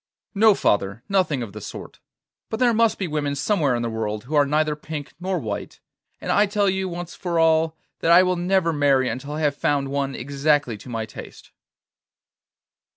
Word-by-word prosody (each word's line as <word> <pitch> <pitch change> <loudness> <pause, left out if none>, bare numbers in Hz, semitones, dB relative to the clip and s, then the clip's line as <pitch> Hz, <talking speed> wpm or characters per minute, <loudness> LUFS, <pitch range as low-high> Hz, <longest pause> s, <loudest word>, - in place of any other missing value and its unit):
'No, 215 0 +5
father, 100 - 0
nothing 180 -10 +1
of 105 -4 -8
the 105 - -8
sort. - - -9 0.5
But 220 - -3
there 245 -2 +4
must 230 0 +3
be 190 - -2
women 145 -2 -2
somewhere 145 - +1
in 120 - -2
the - - -1
world 110 -1 -3
who 140 - -8
are 145 -2 +4
neither 150 +1 +1
pink 150 -2 -7
nor 185 +1 -1
white, 105 -9 -5 0.4
and - - -3
I 205 0 +4
tell 205 0 +1
you, 190 0 0
once 175 0 -6
for 175 -2 -3
all, 160 0 +3 0.2
that 165 - 0
I 175 +2 +8
will 185 0 +1
never 175 -1 +1
marry 140 -3 +3
until 140 +3 -5
I 155 - -3
have 145 -2 +1
found 140 -1 0
one 140 -1 -2
exactly 140 -1 0
to 105 - -12
my 115 -2 -3
taste. - - -12
150 Hz, 195 wpm, -23 LUFS, 135-180 Hz, 0.5 s, I